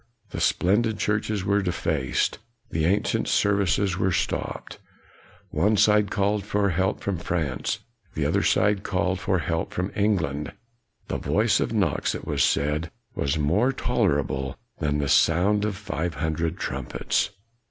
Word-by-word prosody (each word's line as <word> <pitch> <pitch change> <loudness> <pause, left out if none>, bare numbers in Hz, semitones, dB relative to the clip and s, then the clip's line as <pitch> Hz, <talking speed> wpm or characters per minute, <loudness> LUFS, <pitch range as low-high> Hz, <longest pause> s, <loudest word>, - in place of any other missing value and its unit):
The - - -4
splendid 105 +4 +2
churches 105 -1 -1
were 100 +1 +2
defaced; 85 -5 -1 0.3
the 80 -1 0
an 100 +5 +2
cient - - -1
services 100 -2 +2
were 95 - +2
stopped. 85 - -3 0.7
One 105 +1 +2
side 105 0 +4
called 100 0 0
for 100 0 +1
help 95 +4 0
from 100 -4 -2
France; 80 -6 -2 0.3
the - - 0
other - - +2
side 100 -1 +2
called 95 -2 -1
for 95 0 +1
help 80 0 -2
from 90 +2 -2
England. 90 -9 0 0.5
The - - -2
voice 100 - +2
of - - -1
Knox, 95 -10 0
it - - -7
was - - +1
said, 75 +3 +1 0.2
was 70 -5 -1
more 90 - +2
ter 75 - +1
rible 65 +1 -4 0.2
than 75 -2 0
the 70 -1 -1
sound 95 +9 +3
of 105 -2 -2
five 85 -4 -3
hundred 80 +2 -1
trumpets. - - -1
95 Hz, 150 wpm, -25 LUFS, 80-100 Hz, 0.7 s, side